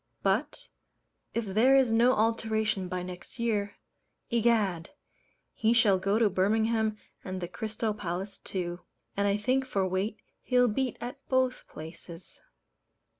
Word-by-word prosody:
But, - - 0 0.7
if 230 -1 0
there 220 +7 +4
is 260 -4 +4
no 240 +3 +5
alteration 220 -3 0
by 180 0 -3
next 180 +5 -9
year, 215 -4 -1 0.6
Egad! 215 -8 +2 0.6
he 225 +1 +2
shall 210 -5 +4
go 195 +3 +1
to 225 -1 +4
Birmingham 220 +3 +1 0.3
and 185 0 -4
the 175 - -4
Crystal 220 +2 -3
Palace 195 0 -5
too; 175 -2 -4 0.4
and 200 0 +1
I 200 0 +2
think 255 +5 +1
for 200 -7 0
weight 190 +4 -1 0.2
he'll 250 -1 +3
beat 250 +3 -1
at 250 +4 -6
both 260 -1 +1
places. 165 +1 -10
215 Hz, 135 wpm, -29 LUFS, 190-235 Hz, 0.7 s, no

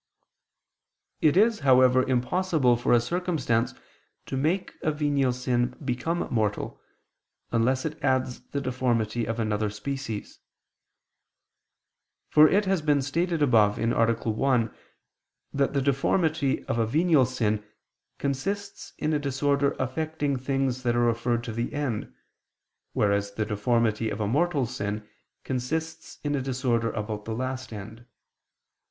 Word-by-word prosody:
It 155 +2 +4
is, 220 +2 +4
however, 130 -2 +5
impossible 130 +1 +2
for 120 - -1
a 120 - +6
circumstance 125 -5 -1 0.5
to - - -4
make 160 +8 0
a 155 - +1
venial 145 -3 +1
sin 125 0 -1
become 145 +7 -1
mortal, 110 -4 -1 0.7
unless 125 +4 +1
it 155 -1 -5
adds 130 -2 0
the 140 - -3
deformity 120 -3 0
of 115 +1 -2
another 110 -1 0
species. 115 +1 -5 1.9
For 155 0 +7
it 205 +2 +3
has 190 -3 +1
been 145 -2 +2
stated 165 +3 0
above 110 -6 +4
(A. 115 - 0 0.3
1) 115 +1 0 0.8
that 140 0 +1
the 140 - +1
deformity 140 +1 +1
of 115 - -1
a 115 - +2
venial 155 0 +3
sin 110 -5 -1 0.5
consists 195 +9 -3
in 155 +1 -1
a 150 - +2
disorder 140 0 +1
affecting 145 +2 -1
things 130 -1 -1
that 120 -2 +1
are - - +2
referred 120 0 0
to 115 - -5
the 115 +2 -3
end, 130 - -2 0.8
whereas 100 -1 +1
the 105 +1 -1
deformity 110 +1 +1
of 105 - -4
a 105 - 0
mortal 145 +3 +1
sin 105 -3 -4 0.4
consists 155 +6 -4
in 145 -1 -1
a 140 - 0
disorder 125 -3 0
about 105 0 -4
the 110 - -3
last 130 +1 -4
end. 110 +3 -9
130 Hz, 135 wpm, -26 LUFS, 115-145 Hz, 1.9 s, For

